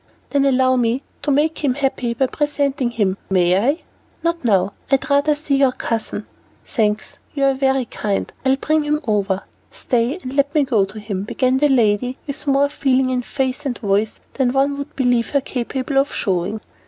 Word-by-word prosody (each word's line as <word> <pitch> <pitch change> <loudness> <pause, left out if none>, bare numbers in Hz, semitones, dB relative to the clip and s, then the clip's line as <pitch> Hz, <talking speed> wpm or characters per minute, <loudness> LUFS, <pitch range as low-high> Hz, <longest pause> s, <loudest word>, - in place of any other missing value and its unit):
"Then 280 -1 +2
allow 260 -1 +3
me 245 +3 +1 0.2
to 295 - -2
make 305 +3 +1
him 260 -3 +2
happy 265 -4 -1
by 265 - +2
presenting 285 -2 0
him, 200 -5 0
may 180 -2 +3
I?" 265 - +1 0.4
"Not 335 -1 -1
now. 200 -4 +2 0.2
I'd 270 -1 +2
rather 285 +2 +3
see 295 -2 0
your 270 -2 +3
cousin." 230 -2 -3 0.4
"Thanks, 215 -2 -1 0.2
you 280 - 0
are 275 0 +4
very 265 -1 +1
kind. 205 -3 -3
I'll 265 0 +3
bring 310 +3 +1
him 300 0 0
over." 200 -2 0 0.3
"Stay, 245 +5 -1
let 280 +3 0
me 300 - +5
go 230 -7 +2
to 200 +3 -9
him," 205 -3 -4
began 255 +5 +1
the 295 +1 +3
lady, 245 0 +2
with 285 +1 -5
more 275 +1 +4
feeling 265 -2 +1
in 250 -1 0
face 265 +2 -2
and 270 -4 -2
voice 205 +1 0
than 255 -3 +1
one 275 +1 +2
would 285 +2 -7
believe 245 -3 +2
her 280 - +1
capable 265 +2 -1
of 275 - +1
showing. 195 +3 -1
260 Hz, 185 wpm, -20 LUFS, 225-280 Hz, 0.4 s, me